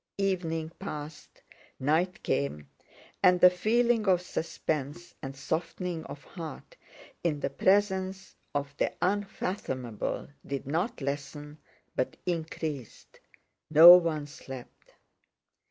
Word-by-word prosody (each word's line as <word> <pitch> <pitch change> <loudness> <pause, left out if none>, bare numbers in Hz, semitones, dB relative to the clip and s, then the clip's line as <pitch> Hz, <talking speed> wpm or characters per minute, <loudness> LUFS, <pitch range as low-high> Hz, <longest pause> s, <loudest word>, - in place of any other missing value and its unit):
Evening 165 -5 -1
passed, 150 -5 -8 0.4
night 160 +7 +1
came, 70 +1 -1 0.5
and 180 -2 +5
the 180 +1 +8
feeling 225 +4 +2
of 180 -2 +4
suspense 160 -1 -3
and 135 0 -7
softening 165 +3 -3
of 145 - -9
heart 170 - -9 0.5
in 155 -4 0
the 140 - -2
presence 190 +2 +1 0.2
of 140 0 -2
the - - +1
unfathomable 180 - -2 0.2
did 140 -2 -4
not 170 - -2
lessen 145 +2 -5 0.4
but 130 - -1
increased. 160 -6 -4 0.5
No 165 +3 +11
one 165 -4 +1
slept. 135 -3 -11
160 Hz, 105 wpm, -29 LUFS, 145-185 Hz, 0.5 s, No